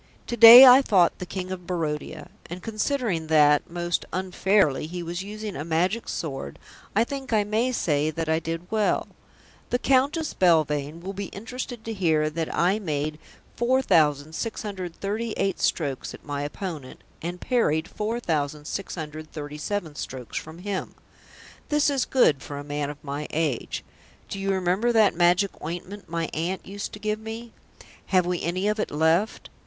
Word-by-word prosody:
To 240 Hz, -, -3 dB
day 235 Hz, +3 st, +12 dB
I 255 Hz, +1 st, +9 dB
fought 190 Hz, -9 st, +3 dB
the 180 Hz, -, -6 dB
King 185 Hz, 0 st, -5 dB
of 180 Hz, -2 st, -6 dB
Barodia, 155 Hz, -3 st, -3 dB, 0.2 s
and 175 Hz, +1 st, -8 dB
considering 220 Hz, -, -1 dB
that, 150 Hz, -2 st, +4 dB
most 175 Hz, 0 st, -2 dB
unfairly, 185 Hz, -4 st, +1 dB
he 175 Hz, +1 st, -5 dB
was 170 Hz, +2 st, -4 dB
using 210 Hz, +1 st, -6 dB
a 145 Hz, -, -4 dB
Magic 175 Hz, +8 st, 0 dB
Sword, 135 Hz, -, -5 dB, 0.4 s
I 220 Hz, -, +5 dB
think 270 Hz, +1 st, -6 dB
I 215 Hz, -2 st, +3 dB
may 220 Hz, +5 st, 0 dB
say 150 Hz, -, +1 dB
that 160 Hz, +1 st, -3 dB
I 160 Hz, 0 st, +2 dB
did 165 Hz, +1 st, -4 dB
well. 215 Hz, -2 st, +1 dB, 0.6 s
The 245 Hz, -, +2 dB
Countess 280 Hz, +5 st, +1 dB
Belvane 155 Hz, -3 st, +2 dB
will 190 Hz, +3 st, -5 dB
be 200 Hz, +1 st, -4 dB
interested 240 Hz, +2 st, -7 dB
to 225 Hz, -, -3 dB
hear 160 Hz, -6 st, +1 dB
that 160 Hz, 0 st, -3 dB
I 185 Hz, +5 st, +2 dB
made 150 Hz, -4 st, -3 dB, 0.4 s
4,638 195 Hz, -, 0 dB
strokes 140 Hz, -5 st, -1 dB
at -, -, -17 dB
my 145 Hz, -1 st, -3 dB
opponent 150 Hz, -2 st, -6 dB, 0.2 s
and 175 Hz, +2 st, -5 dB
parried 165 Hz, -11 st, +1 dB
4,637 155 Hz, -3 st, -4 dB
strokes 130 Hz, -4 st, -7 dB
from 160 Hz, +1 st, -6 dB
him. 190 Hz, +1 st, -4 dB, 0.7 s
This 295 Hz, 0 st, +3 dB
is 275 Hz, -2 st, 0 dB
good 155 Hz, -, +3 dB
for 145 Hz, -, -7 dB
a 145 Hz, -, -6 dB
man 145 Hz, 0 st, -3 dB
of 145 Hz, -, -7 dB
my 145 Hz, +1 st, -4 dB
age. 150 Hz, -6 st, -2 dB, 0.5 s
Do 195 Hz, -, -5 dB
you 195 Hz, 0 st, -2 dB
remember 190 Hz, +5 st, +1 dB
that 220 Hz, -3 st, +4 dB
magic 175 Hz, +3 st, +2 dB
ointment 180 Hz, +4 st, -6 dB
my 165 Hz, 0 st, -1 dB
aunt 175 Hz, +4 st, -3 dB
used 200 Hz, +1 st, -6 dB
to -, -, -6 dB
give 215 Hz, 0 st, -2 dB
me? 225 Hz, +1 st, -8 dB, 0.5 s
Have 185 Hz, -2 st, +3 dB
we 180 Hz, -1 st, -1 dB
any 185 Hz, +4 st, -1 dB
of 210 Hz, +1 st, 0 dB
it -, -, -1 dB
left? 160 Hz, +7 st, +1 dB
180 Hz, 155 wpm, -25 LUFS, 155-215 Hz, 0.7 s, day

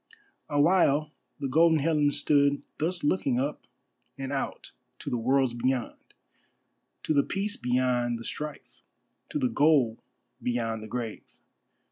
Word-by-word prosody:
Awhile 150 Hz, -1 st, +3 dB, 0.3 s
the 140 Hz, -, -2 dB
Golden 160 Hz, +4 st, +4 dB
Helen 150 Hz, -1 st, +2 dB
stood 145 Hz, 0 st, +2 dB, 0.2 s
thus 175 Hz, +3 st, -1 dB
looking 140 Hz, -5 st, +1 dB
up 140 Hz, +3 st, -3 dB, 0.5 s
and 135 Hz, 0 st, -5 dB
out 135 Hz, -, -4 dB, 0.3 s
to -, -, -6 dB
the 125 Hz, -, 0 dB
worlds 130 Hz, +1 st, +2 dB
beyond; 125 Hz, 0 st, -3 dB, 0.9 s
to -, -, 0 dB
the 140 Hz, -, +5 dB
peace 200 Hz, +6 st, -3 dB
beyond 125 Hz, -1 st, 0 dB
the 115 Hz, -, -9 dB
strife, 150 Hz, 0 st, -7 dB, 0.5 s
to -, -, -2 dB
the 265 Hz, -3 st, +1 dB
goal 145 Hz, -, +3 dB, 0.4 s
beyond 115 Hz, -2 st, -2 dB
the 110 Hz, -, -8 dB
grave. 115 Hz, -1 st, -6 dB
140 Hz, 130 wpm, -28 LUFS, 125-150 Hz, 0.9 s, the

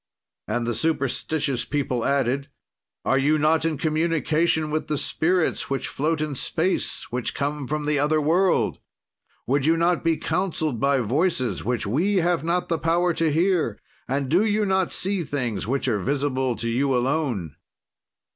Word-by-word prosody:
"And 120 Hz, +2 st, -1 dB
the 120 Hz, -, -1 dB
superstitious 140 Hz, 0 st, -1 dB
people 130 Hz, -5 st, -2 dB
added: 140 Hz, 0 st, 0 dB, 0.6 s
"'Are 135 Hz, -, +3 dB
you 150 Hz, +3 st, +3 dB
not 155 Hz, +2 st, +2 dB
in 160 Hz, -2 st, 0 dB
communication 160 Hz, 0 st, +1 dB
with 155 Hz, +1 st, -2 dB
the 150 Hz, -, -1 dB
spirits, 175 Hz, +4 st, 0 dB
which 135 Hz, -1 st, -2 dB
float 155 Hz, +2 st, -1 dB
in 155 Hz, -1 st, -2 dB
space, 165 Hz, +7 st, -1 dB
which 125 Hz, 0 st, -3 dB
come 145 Hz, -1 st, -2 dB
from 150 Hz, +1 st, -2 dB
the 150 Hz, -1 st, +1 dB
other 150 Hz, +2 st, +2 dB
world? 175 Hz, +5 st, +2 dB, 0.7 s
"Would 140 Hz, +3 st, +1 dB
you 165 Hz, +1 st, +4 dB
not 170 Hz, +1 st, +2 dB
be 165 Hz, -1 st, +2 dB
counseled 160 Hz, -, -1 dB
by 140 Hz, +1 st, +2 dB
voices 130 Hz, -, 0 dB
which 120 Hz, 0 st, -1 dB
we 165 Hz, -, +1 dB
have 175 Hz, -2 st, +2 dB
not 175 Hz, +2 st, 0 dB
the 165 Hz, -2 st, -1 dB
power 170 Hz, +2 st, +2 dB
to 165 Hz, -1 st, +1 dB
hear, 165 Hz, -, +1 dB, 0.3 s
and 135 Hz, +1 st, -1 dB
do 175 Hz, +9 st, +3 dB
you 215 Hz, -1 st, +1 dB
not 190 Hz, -2 st, +1 dB
see 195 Hz, 0 st, 0 dB
things 125 Hz, -9 st, -3 dB
which 135 Hz, +2 st, -1 dB
are 110 Hz, -5 st, +1 dB
visible 130 Hz, +1 st, 0 dB
to 115 Hz, -, -4 dB
you 130 Hz, +3 st, +1 dB
alone?' 125 Hz, -, -1 dB
150 Hz, 165 wpm, -24 LUFS, 130-165 Hz, 0.7 s, you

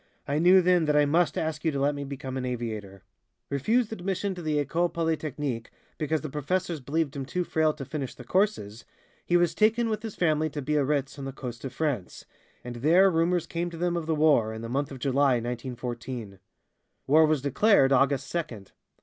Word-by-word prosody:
"I 145 Hz, +2 st, 0 dB
knew 180 Hz, +2 st, +6 dB
then 180 Hz, -2 st, +3 dB
that 150 Hz, -1 st, +1 dB
I 150 Hz, 0 st, +5 dB
must 165 Hz, +3 st, +2 dB
ask 160 Hz, -1 st, -2 dB
you 165 Hz, -, +2 dB
to 140 Hz, -, -1 dB
let 140 Hz, +2 st, +2 dB
me 145 Hz, 0 st, -5 dB
become 135 Hz, -1 st, -6 dB
an 130 Hz, -, -3 dB
aviator." 110 Hz, -6 st, -5 dB, 0.5 s
Refused 220 Hz, -, +1 dB
admission 195 Hz, 0 st, -2 dB
to 180 Hz, -, -8 dB
the 155 Hz, -2 st, -1 dB
École 170 Hz, +4 st, 0 dB
Polytechnique 150 Hz, -7 st, -2 dB, 0.3 s
because 155 Hz, 0 st, 0 dB
the 155 Hz, -, -4 dB
professors 170 Hz, +4 st, -2 dB
believed 145 Hz, +2 st, -2 dB
him 140 Hz, -, -3 dB
too 180 Hz, +7 st, -2 dB
frail 160 Hz, -2 st, +1 dB
to 140 Hz, -3 st, -8 dB
finish 140 Hz, -2 st, -5 dB
the 125 Hz, -, -10 dB
courses, 120 Hz, -, 0 dB, 0.4 s
he 175 Hz, -, +3 dB
was 175 Hz, -1 st, +2 dB
taken 225 Hz, +2 st, +2 dB
with 215 Hz, -1 st, -2 dB
his 220 Hz, -2 st, -6 dB
family 155 Hz, -2 st, +1 dB
to 145 Hz, 0 st, -5 dB
Biarritz 145 Hz, -1 st, 0 dB
on 135 Hz, -, -5 dB
the 135 Hz, -, -4 dB
coast 120 Hz, -3 st, -8 dB
of 135 Hz, -, -4 dB
France, 135 Hz, -, -3 dB, 0.4 s
and 120 Hz, -1 st, -7 dB
there 175 Hz, +9 st, +5 dB
rumors 170 Hz, +1 st, +1 dB
came 170 Hz, +1 st, -3 dB
to 170 Hz, -, -9 dB
them 175 Hz, +1 st, 0 dB
of 165 Hz, -2 st, -3 dB
the 160 Hz, -, +1 dB
war, 150 Hz, -8 st, +3 dB
in 110 Hz, -, -7 dB
the 115 Hz, -, -5 dB
month 140 Hz, +3 st, -1 dB
of 135 Hz, -, -8 dB
July, 135 Hz, +1 st, +2 dB
1914. 120 Hz, -3 st, -5 dB, 0.7 s
War 155 Hz, +3 st, +5 dB
was 150 Hz, -3 st, +1 dB
declared 145 Hz, -, +4 dB
August 135 Hz, 0 st, +3 dB
second. 120 Hz, -, -5 dB
150 Hz, 200 wpm, -27 LUFS, 130-170 Hz, 0.7 s, knew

